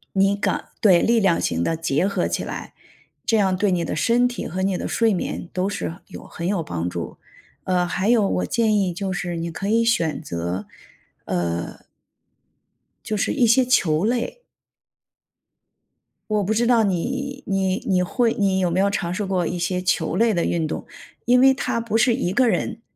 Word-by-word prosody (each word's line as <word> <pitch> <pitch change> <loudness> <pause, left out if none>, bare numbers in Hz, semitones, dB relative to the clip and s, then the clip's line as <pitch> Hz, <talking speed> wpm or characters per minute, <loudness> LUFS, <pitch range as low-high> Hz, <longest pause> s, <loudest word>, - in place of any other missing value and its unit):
那 195 +1 +3
个 205 - -1
对， 185 -5 +5
力 230 -1 +3
量 190 -4 +2
型 85 0 -1
的 165 - 0
结 165 +2 0
合 200 - 0
起 - - -2
来。 - - -7 0.5
这 225 - +3
样 195 -3 +2
对 200 +1 +1
你 175 -2 0
的 - - -3
身 235 +9 +3
体 245 - -4
和 185 +2 -3
你 190 -1 0
的 - - -4
睡 225 -2 +2
眠 175 -1 -4
都 185 +2 -1
是 175 -4 -4
有 - - -11
很 170 - -6
有 195 -5 0
帮 85 - -3
助， 85 -1 -6 0.5
呃， 180 -1 +1
还 185 +3 -1
有 225 -4 +4
我 90 - -1
建 220 - +1
议 195 -3 +2
就 190 +1 -3
是 175 -1 -3
你 165 0 -3
可 195 +4 -4
以 230 +2 +3
选 165 -9 +1
择， 85 - -4 1.0
呃 - - -13 1.2
就 215 - -2
是 205 - 0
一 255 -5 +3
些 235 +3 +5
球 180 -10 +2
类。 245 - -1 1.9
我 210 -1 +1
不 205 - 0
知 230 +2 +1
道 235 -2 +4
你 265 +9 -2
你 190 -1 0
你 185 -2 +3
会 230 +5 +1
你 195 -2 +1
有 180 -2 +1
没 175 - -1
有 200 +1 +3
尝 175 -3 -2
试 205 - -2
过 185 -3 0
一 175 - -3
些 180 +2 -1
球 180 -3 0
类 225 +1 +3
的 170 - 0
运 165 -2 0
动？ - - -5 0.4
因 250 +1 +4
为 265 0 +6
它 245 -3 -2
不 225 -1 -1
是 235 +1 +4
一 205 -8 -1
个 255 +6 +3
人。 225 +1 -2
195 Hz, 210 characters per minute, -22 LUFS, 175-230 Hz, 1.9 s, 为